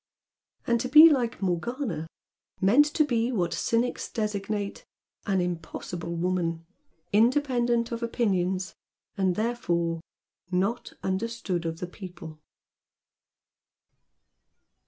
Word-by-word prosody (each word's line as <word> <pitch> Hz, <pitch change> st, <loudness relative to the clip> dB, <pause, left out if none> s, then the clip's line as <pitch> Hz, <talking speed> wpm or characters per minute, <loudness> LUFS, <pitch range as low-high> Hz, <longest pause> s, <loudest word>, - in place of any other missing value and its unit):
And 235 Hz, -1 st, +2 dB
to 255 Hz, -, -3 dB
be 315 Hz, +3 st, +10 dB
like 240 Hz, -7 st, 0 dB
Morgana, 185 Hz, -, -2 dB, 0.5 s
meant 235 Hz, +10 st, +5 dB
to 305 Hz, 0 st, +2 dB
be 235 Hz, -3 st, +1 dB
like 250 Hz, -, -2 dB
what 175 Hz, -2 st, 0 dB
cynics 235 Hz, +2 st, 0 dB
designate 210 Hz, -2 st, -3 dB, 0.4 s
"an 195 Hz, -2 st, +2 dB
impossible 170 Hz, 0 st, -4 dB
woman," 170 Hz, -1 st, -1 dB, 0.5 s
independent 240 Hz, 0 st, +2 dB
of 235 Hz, 0 st, -3 dB
opinions 190 Hz, -6 st, 0 dB, 0.4 s
and 190 Hz, -3 st, +1 dB
therefore 170 Hz, -8 st, -1 dB, 0.5 s
"not 195 Hz, +6 st, -1 dB
understood 190 Hz, -3 st, -2 dB
of 165 Hz, 0 st, -5 dB
the -, -, -1 dB
people." 175 Hz, -4 st, -10 dB
200 Hz, 100 wpm, -27 LUFS, 175-235 Hz, 0.5 s, be